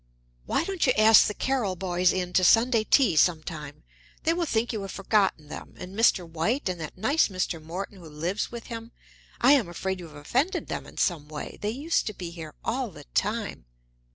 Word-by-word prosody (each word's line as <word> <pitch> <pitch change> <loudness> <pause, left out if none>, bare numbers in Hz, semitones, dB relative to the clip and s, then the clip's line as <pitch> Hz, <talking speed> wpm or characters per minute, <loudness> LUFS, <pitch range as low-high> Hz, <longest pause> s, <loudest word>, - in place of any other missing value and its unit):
"Why - - +1
don't 375 -4 -1
you 255 - +5
ask 220 +1 +7
the 210 - -3
Carryl 240 -9 -1
boys 180 0 +2
in 180 -1 -2
to 185 - +3
Sunday 230 +4 +5
tea 220 - +4
some 155 0 +3
time? 150 -4 -8 0.4
They 325 - +3
will 340 -1 -1
think 235 -1 0
you 215 - -3
have 195 - -6
forgotten 195 -6 +1
them. - - -9
And 185 +2 -9
Mr. 205 -5 +3
White 170 - -1
and 180 -2 -3
that 155 - -7
nice 275 +11 +3
Mr. 185 -4 -3
Morton 185 +5 -6
who 165 -3 -11
lives 170 +7 -3
with 235 -1 -7
him 230 0 -8 0.5
I 250 - +6
am 265 -11 +4
afraid 190 +2 -3
you 175 - -8
have 150 - -15
offended 260 - -1
them - - -4
in - - -15
some 160 -5 0
way. 150 -1 -7
They 205 - -1
used 285 +9 0
to 215 - -4
be 175 -2 -6
here 160 -3 -9
all 245 +1 -1
the 150 -6 -12
time." 210 - -1
195 Hz, 210 wpm, -27 LUFS, 170-230 Hz, 0.5 s, ask